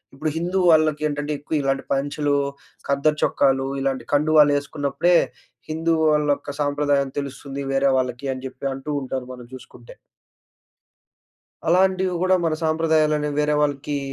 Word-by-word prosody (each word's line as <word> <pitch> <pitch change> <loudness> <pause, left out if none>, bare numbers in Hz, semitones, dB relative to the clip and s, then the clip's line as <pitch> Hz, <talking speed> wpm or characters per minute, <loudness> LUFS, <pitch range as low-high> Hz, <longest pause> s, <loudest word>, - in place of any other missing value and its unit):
ఇప్పుడు 155 +3 -2
హిందూ 175 +3 -1
వాళ్ళకేంటంటే 150 -1 +1
ఎక్కువ 150 - -8
ఇలాంటి 135 0 -1
పంచలు, 145 +1 -1 0.5
ఖద్దర్ 140 +2 +1
చొక్కాలు 135 -1 +2
ఇలాంటి 135 -3 -2
కండువాలు 150 0 +5
ఏసుకున్నప్పుడే 145 +4 0 0.5
హిందూ 165 +1 0 0.2
వాళ్ళొక్క 150 -1 0
సాంప్రదాయం 145 -1 +1
తెలుస్తుంది 140 0 -6
వేరే 135 0 +3
వాళ్ళకి 125 +1 -2
అని 130 0 -9
జెప్పి 130 +1 -6
అంటూ 135 +2 -8
ఉంటారు 130 -1 -4
మనం 125 -1 -11
చూసుకుంటే. 120 -2 -14 1.8
అలాంటివి 185 +1 +2
గూడా 185 0 +4
మన 160 -1 +1
సాంప్రదాయాల‌ని 155 -2 +1
వేరే 150 0 +2
వాళ్ళకీ 145 0 -1
145 Hz, 125 wpm, -22 LUFS, 135-155 Hz, 1.8 s, కండువాలు